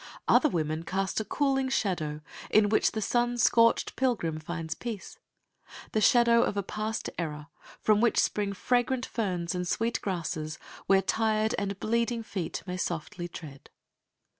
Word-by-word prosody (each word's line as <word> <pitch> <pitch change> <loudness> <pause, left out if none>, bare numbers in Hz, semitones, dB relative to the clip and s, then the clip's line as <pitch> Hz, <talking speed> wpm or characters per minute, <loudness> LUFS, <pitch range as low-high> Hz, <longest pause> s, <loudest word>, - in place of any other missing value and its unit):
Other 305 - +5
women 155 - -1
cast 190 +5 -1
a - - -1
cooling 270 +2 0
shadow, 165 - -1 0.3
in 210 -1 +4
which 215 - +2
the 220 - -2
sun 240 +3 +1
scorched 230 0 +4
pilgrim 205 -12 0
finds 165 0 -4
peace 220 +1 -7 0.7
the 215 - +1
shadow 235 0 +5
of 205 - 0
a 200 - 0
past 215 +3 -3
error, 150 -2 -4 0.3
from 215 -1 +3
which 235 - +3
spring 205 -1 +1
fragrant 245 +4 0
ferns 180 -7 -2
and 180 -1 -2
sweet 230 +5 0
grasses, 160 -4 -3 0.3
where 195 0 +4
tired 220 +1 +1
and 200 -1 -3
bleeding 235 +1 0
feet 185 -6 -4
may 180 -1 -4
softly 175 0 -3
tread. 150 -5 -10
200 Hz, 150 wpm, -29 LUFS, 170-230 Hz, 0.7 s, Other